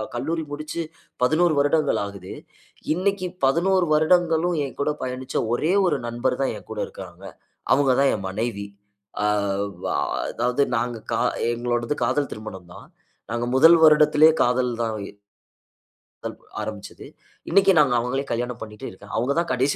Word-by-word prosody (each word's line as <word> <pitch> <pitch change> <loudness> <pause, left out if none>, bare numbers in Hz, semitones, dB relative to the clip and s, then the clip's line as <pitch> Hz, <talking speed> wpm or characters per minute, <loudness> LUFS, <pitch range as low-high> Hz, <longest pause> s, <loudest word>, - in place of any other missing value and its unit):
கல்லூரி 160 +6 -2
முடிச்சு 155 +3 -4 0.4
11 155 +5 +3
வருடங்கள் 145 +1 +2
ஆகுது. 100 -2 -9 0.6
இன்னைக்கி 185 +1 -1 0.2
11 180 +6 +2
வருடங்களும் 165 +1 +2
என்கூட 140 +2 -2
பயணிச்ச 130 0 -5 0.2
ஒரே 160 +9 +1
ஒரு - - +2
நண்பர் 125 +2 -1
தான் 135 - 0
என் - - -15
கூட 110 - -3
இருக்காங்க. 90 0 -11 0.5
அவங்கதான் 135 0 +3
என் 100 - -6
மனைவி. 100 0 -3 0.6
ஆ- - - +2 0.6
வ- - - -4 0.5
அதாவது 125 +4 +1
நாங்க 120 0 -2 0.6
எங்களோடது 120 +3 -1
காதல் 135 +4 0
திருமணம் 95 -5 -9
தான். - - -13 0.4
நாங்க 120 0 -1
முதல் 165 +5 +7
வருடத்திலயே 155 0 +6
காதல் 125 0 +1
தான் 110 -1 -2 1.7
ஆரம்பிச்சது. - - -7 0.4
இன்னைக்கி 195 +2 +5
நாங்க 135 -4 +4
அவங்களயே 135 +3 -2
கல்யாணம் 120 0 -3
பண்ணிட்டு 105 -1 -8
இருக்கேன். 105 +2 -13
அவங்க 125 +5 0
தான் 170 - -2
கடைசி 130 +3 +1
130 Hz, 130 wpm, -23 LUFS, 120-155 Hz, 1.7 s, முதல்